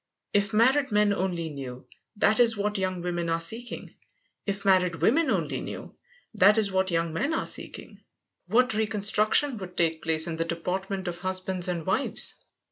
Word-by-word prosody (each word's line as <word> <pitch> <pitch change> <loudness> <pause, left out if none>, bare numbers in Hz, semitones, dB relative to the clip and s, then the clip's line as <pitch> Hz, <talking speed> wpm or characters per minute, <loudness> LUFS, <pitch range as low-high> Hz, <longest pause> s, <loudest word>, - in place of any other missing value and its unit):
If 200 -1 +2
married 260 +6 +3
men 210 0 +3
only 180 -4 -2
knew 130 -4 -8 0.3
that 215 +2 +2
is 230 -2 +4
what 205 0 -1
young 185 -2 -2
women 175 -1 -2
are 165 0 +1
seeking, 225 +9 -5 0.5
if 200 0 -3
married 185 -3 +3
women 245 - +2
only - - -1
knew - - -7 0.4
that 210 +1 +5
is 210 -3 +1
what 190 0 +1
young 165 -1 -1
men 280 - -1
are - - -1
seeking, - - -3 0.5
what 250 0 +3
reconstruction 215 +4 +1
would 180 -2 -9
take 165 -1 +1
place 160 -1 +1
in 165 -2 -4
the 165 - -1
deportment 190 +3 -3
of 175 0 -4
husbands 185 -1 -2
and 170 -3 -3
wives! 190 +8 0
190 Hz, 170 wpm, -27 LUFS, 170-215 Hz, 0.5 s, that